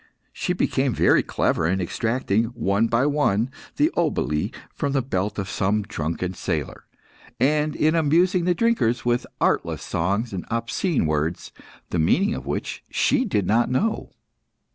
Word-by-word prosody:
She - - -1
became - - 0
very - - +4
clever 80 - 0
in 95 +2 +1
extracting, 115 +3 0
one 110 0 +1
by 115 +3 +2
one, 135 -6 +1 0.2
the - - +2
oboli 75 0 0 0.2
from 140 -1 -2
the 135 - +2
belt 105 -4 -2
of 100 -2 -3
some 100 +2 0
drunken 90 -1 -3
sailor, 80 -6 -4 0.5
and 150 +2 +2
in 155 +1 +2
amusing 170 +3 +3
the 180 -1 +2
drinkers 125 - +1
with 120 0 +1
artless - - 0
songs 100 +7 -1
and 90 - -3
obscene 115 - 0
words, 75 +2 -1 0.4
the 85 - 0
meaning 195 - +3
of - - -6
which - - -4
she 270 -2 +2
did 105 - 0
not 115 +5 +2
know. 210 - 0
115 Hz, 150 wpm, -23 LUFS, 95-150 Hz, 0.5 s, very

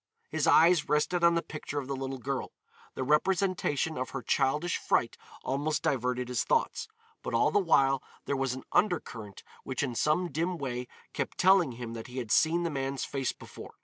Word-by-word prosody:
His - - 0
eyes 165 -2 +5
rested 150 +4 +1
on 170 0 +6
the 170 - 0
picture 150 -1 -6
of 140 - -2
the 140 - -2
little 135 0 -4
girl. 135 +1 -4 0.4
The - - -2
representation 160 -1 +1
of 130 - -3
her 135 -3 -5
childish 150 +5 +1
fright - - +1 0.3
almost 145 +3 -1
diverted 125 -1 0
his 125 -2 0
thoughts, - - 0 0.3
but - - -3
all 115 - +3
the - - +4
while 135 -7 +3 0.2
there 140 - -1
was 135 -2 -1
an 130 - -8
undercurrent 115 - -1 0.2
which 130 +1 -2
in 130 -3 -2
some 155 +8 +1
dim 170 +3 -1
way 125 -4 -4 0.3
kept - - -3
telling 185 -7 +4
him 115 -1 -7
that 115 -1 -7
he 125 +1 -9
had 120 -4 -4
seen 170 +2 +3
the 170 - -1
man's 135 -1 -2
face 135 -2 -2
before. - - -12
140 Hz, 190 wpm, -29 LUFS, 130-165 Hz, 0.4 s, on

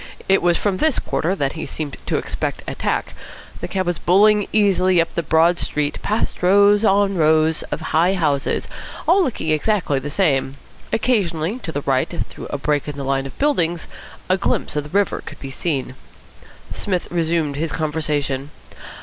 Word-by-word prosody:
It 195 0 +4
was 175 -1 +3
from 200 -3 0
this 310 +4 +2
quarter 180 +4 -1
that 140 -6 -1
he 160 - -5
seemed 150 -3 -5
to - - +1
expect - - -3
attack. - - -2 0.5
The - - -4
cab 190 -1 -2
was 175 -1 -1
bowling 205 +3 +4
easily 190 -4 +3
up 165 - 0
the 170 - 0
broad 165 +2 +3
street, 150 -1 -2
past 215 +2 -2
rows 200 +3 +5
on 200 -2 +3
rows 155 0 +3
of - - -3
high 175 +4 +3
houses, 145 -6 0 0.4
all 365 +4 +5
looking 215 - -2
exactly 155 -2 +1
the 140 +2 -5
same. 140 -5 +1 0.3
Occasionally, 200 -4 0
to 170 - -6
the 145 - -3
right, 135 -2 +1 0.2
through - - -9
a - - -2
break 145 +1 -1
in 145 -1 -5
the 140 - -4
line 135 0 0
of 135 - -13
buildings, 175 - 0 0.4
a 185 - +2
glimpse - - -1
of 150 -1 -1
the - - -9
river 205 -2 +1
could - - -10
be 135 - -7
seen. 135 -3 -2 0.8
Psmith 185 -3 -2
resumed 165 -3 0
the 155 +4 -2
conversation. 150 -3 -2
165 Hz, 175 wpm, -20 LUFS, 150-195 Hz, 0.8 s, rows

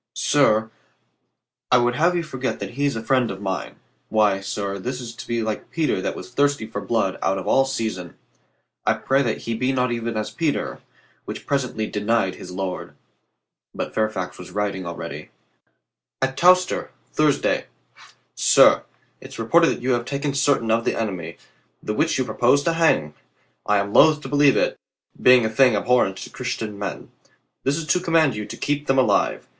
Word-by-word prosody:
"Sir, 110 -6 +2 1.0
I 125 - +7
would 120 0 +2
have 170 +5 +2
you 170 - 0
forget 135 -4 -4
that - - -5
he 140 +4 -2
is 140 - -2
friend 125 +2 +1
of 95 - -6
mine. 95 -1 -4 0.3
Why, 105 -3 +2
sir, 100 0 -4
this 125 +6 -4
is 120 -2 -7
to 115 - -10
be 115 -1 -1
like 110 -1 -4
Peter 155 - 0
that - - -3
was - - -9
thirsty 140 -2 +1
for 110 - -6
blood 110 -5 -1
out 95 +1 +1
of 95 - -5
all 135 - +4
season. 110 -9 -4 0.7
I - - +3
pray 135 +1 +1
that 115 -5 -1
he 115 - -2
be 125 +4 0
not 125 -2 0
even 115 -1 -3
as 110 - -3
Peter, 160 -3 -2 0.5
which - - -7
presently 125 -6 -1
denied 105 -2 0
his 90 - -10
Lord." 90 0 -5 0.8
But - - -4
Fairfax 100 -5 -2
was 90 - -9
writing 100 -3 -3
already: 85 - -7 0.9
At 135 0 -1
Towcester, 180 +3 +3 0.2
Thursday. 150 -2 +1 0.7
Sir - - +5 0.2
— - - -40
It's - - -11
reported 165 +9 +4
that - - -1
you 130 - +1
have 120 -1 0
taken 140 +1 -2
certain 135 -5 +1
of 115 +1 +2
the - - -1
enemy, 90 -7 -4 0.5
the 105 - -2
which 155 +8 +1
you 130 - 0
purpose 130 +4 +2
to 165 - +1
hang. 160 - +2 0.5
I 105 - +3
am 100 0 -2
loath 155 0 +6
to 135 - -7
believe 145 0 +4
it, - - 0 0.4
being 125 -2 +6
a - - 0
thing 125 0 +4
abhorrent 105 -3 +2
to - - -8
Christian 110 -5 -4
men. 100 - -6 0.5
This 140 +3 +1
Is 165 - -4
to 180 - +2
command 165 -7 +2
you 105 0 -5
to - - -8
keep 145 0 -2
them 135 - +2
alive. 130 - +1
120 Hz, 185 wpm, -22 LUFS, 105-140 Hz, 1.0 s, I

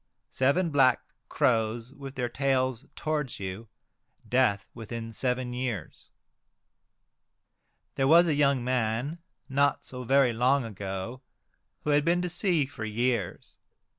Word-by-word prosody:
Seven 150 +7 +2
black 130 -4 +4 0.3
crows 115 +1 0
with 140 -1 -9
their 125 -1 -1
tails 130 -1 0
towards 150 -6 -2
you, 95 +4 -6 0.6
death 120 -6 +2
within 115 0 -7
seven 125 +1 -1
years. 125 - -5 1.8
There 135 - +1
was 170 +4 +7
a 160 - +1
young 140 -3 +2
man, 125 +5 -1 0.3
not 140 +1 +1
so 125 -1 -6
very 135 0 +4
long 125 +3 +2
ago, 100 +3 -5 0.6
who 150 - 0
had 145 0 +4
been 175 +2 +2
to 180 - -1
sea 175 -4 +1
for 130 -5 -8
years. 115 -2 -2
130 Hz, 125 wpm, -28 LUFS, 115-140 Hz, 1.8 s, was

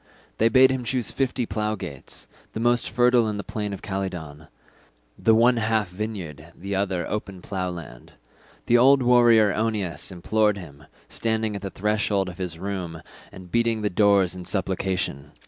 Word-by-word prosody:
They 115 - +4
bade 130 +2 +6
him 130 -1 -2
choose 125 0 -1
fifty 130 -2 -1
plough 105 +1 -2
gates, 70 -9 -7 0.3
the - - -4
most 120 +1 +2
fertile 120 -2 +3
in 105 - -3
the 100 - -4
plain 105 -2 -4
of 100 - -7
Calydon, 90 -7 -5 0.7
the 110 - +3
one 120 +2 +4
half 110 -3 0
vineyard 95 -6 -5
and 85 +2 -17
the 100 +2 -5
other 95 -3 -1
open 100 -3 -4
plough 95 -2 -3
land. 85 -9 -10 0.5
The 120 0 +4
old 135 +1 +6
warrior 120 -4 +5
Oeneus 100 -8 -2
implored 105 +3 +1
him, 75 -6 -11 0.2
standing 110 -2 -1
at 100 - -5
the 100 - -4
threshold 105 -1 0
of 90 - -11
his 90 -3 -4
room 90 -4 -5 0.3
and 90 -2 -12
beating 115 -2 +1
the 105 - 0
doors 100 -2 +3
in 90 -1 -8
supplication. 90 -6 -2
100 Hz, 170 wpm, -24 LUFS, 90-115 Hz, 0.7 s, bade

